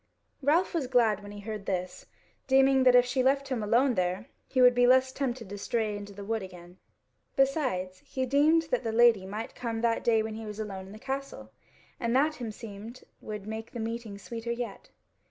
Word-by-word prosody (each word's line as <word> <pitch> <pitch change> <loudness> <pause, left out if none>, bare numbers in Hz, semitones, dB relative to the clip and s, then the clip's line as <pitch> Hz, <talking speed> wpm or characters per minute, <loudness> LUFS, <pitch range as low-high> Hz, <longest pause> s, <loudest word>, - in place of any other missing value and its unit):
Ralph 315 +8 +2
was 315 -7 -1
glad 230 -5 +3
when 205 0 -10
he 205 0 -9
heard 210 -1 -6
this, 185 -1 -3 0.4
deeming 265 0 +4
that 250 -1 +7
if 245 0 +7
she 255 +1 0
left 275 +1 +2
him 255 -4 -1
alone 240 +5 +3
there, 185 +4 -1 0.2
he 260 - -1
would 250 -1 +7
be 245 0 +4
the - - +5
less 260 0 +5
tempted 255 -5 -3
to 205 +1 -7
stray 215 0 -1
into 205 0 -8
the 200 0 -9
wood 225 +1 -1
again. 180 -1 -11 0.6
Besides, 255 - 0
he 260 +6 -3
deemed 295 +5 +4
that 250 - +1
the 225 - -1
Lady 225 -4 +4
might 210 +3 -5
come 230 -2 -4
that 230 -1 +1
day 225 -2 +3
when 220 0 -5
he 220 0 -7
was 210 0 -7
alone 195 -3 -5
in - - -12
the 210 - -10
Castle, 265 - -6 0.5
and 235 +1 0
that 300 +3 +2
himseemed 225 0 -8 0.2
would 210 -2 -7
make 220 +1 -6
the 240 - -5
meeting 225 -2 -4
sweeter 230 +3 -6
yet. 235 0 -5
230 Hz, 210 wpm, -29 LUFS, 205-260 Hz, 0.6 s, that